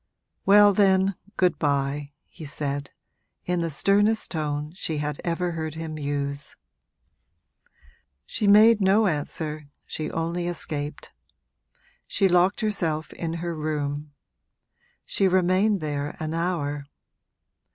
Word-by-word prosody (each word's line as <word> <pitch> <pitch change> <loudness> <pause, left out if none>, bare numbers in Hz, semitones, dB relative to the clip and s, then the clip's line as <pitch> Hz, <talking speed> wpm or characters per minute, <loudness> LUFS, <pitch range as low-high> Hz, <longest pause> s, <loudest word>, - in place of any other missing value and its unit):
'Well 205 +1 +7
then, 195 -1 +3 0.2
good 180 -1 +2
bye,' 140 0 0
he - - -13
said, 145 -1 -4 0.6
in 180 -1 0
the 165 - -1
sternest 205 +8 +2
tone 150 -2 -2
she 165 -4 -3
had 150 0 -3
ever 175 +1 -1
heard 160 -2 -4
him 160 -1 -5
use. 140 0 -3 1.7
She 210 - -2
made 215 +2 +7
no 195 +3 +4
answer, 150 -2 -3 0.2
she 155 - -4
only 170 +2 -2
escaped. 150 -3 -4 1.0
She 195 - +2
locked 180 +2 +3
herself 165 -8 -1
in 165 -1 -4
her 170 -1 -2
room; 150 -1 -3 0.9
she 195 - +2
remained 185 +2 +2
there 145 -1 -3
an 155 0 -3
hour. 145 -5 -2
160 Hz, 115 wpm, -25 LUFS, 145-190 Hz, 1.7 s, Well